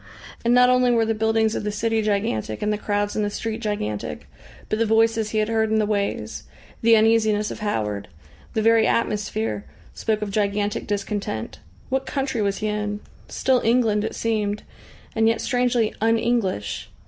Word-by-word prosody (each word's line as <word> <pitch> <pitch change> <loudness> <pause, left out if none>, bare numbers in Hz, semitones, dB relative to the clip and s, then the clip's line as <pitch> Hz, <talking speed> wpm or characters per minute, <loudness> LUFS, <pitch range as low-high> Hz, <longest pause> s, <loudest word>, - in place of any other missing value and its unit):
And 235 - +2
not 250 0 +6
only 250 0 +4
were 230 -2 +3
the 225 - +1
buildings 220 0 +1
of - - -3
the 210 - -1
city 225 +2 0
gigantic 200 - -1
and 210 0 +1
the - - -1
crowds 205 -1 -1
in 215 - 0
the 205 - 0
street 225 +2 -4
gigantic, 105 - -3 0.4
but 215 - -1
the 230 - +3
voices 225 0 +3
he 220 - -2
had 215 0 +2
heard 220 -1 +1
in 220 - +2
the 215 - +2
ways, 205 -1 -2 0.4
the 230 -1 +6
uneasiness 220 -1 +3
of - - -7
Howard, 105 - -2 0.5
the 220 - 0
very 225 0 +5
atmosphere 110 - -1 0.3
spoke 215 -1 -1
of 205 - -4
gigantic 205 0 -1
discontent. 200 - -3 0.3
What 265 +1 -1
country 265 -4 -1
was 200 -1 0
he 215 - -2
in? 210 0 -2 0.3
Still 255 -2 +1
England 225 -3 +2
it 220 - -3
seemed, 210 -2 -1 0.5
and 225 0 +3
yet 230 - +2
strangely 245 -3 +1
"un 225 +1 +3
English." 225 - -1
215 Hz, 180 wpm, -23 LUFS, 205-225 Hz, 0.5 s, not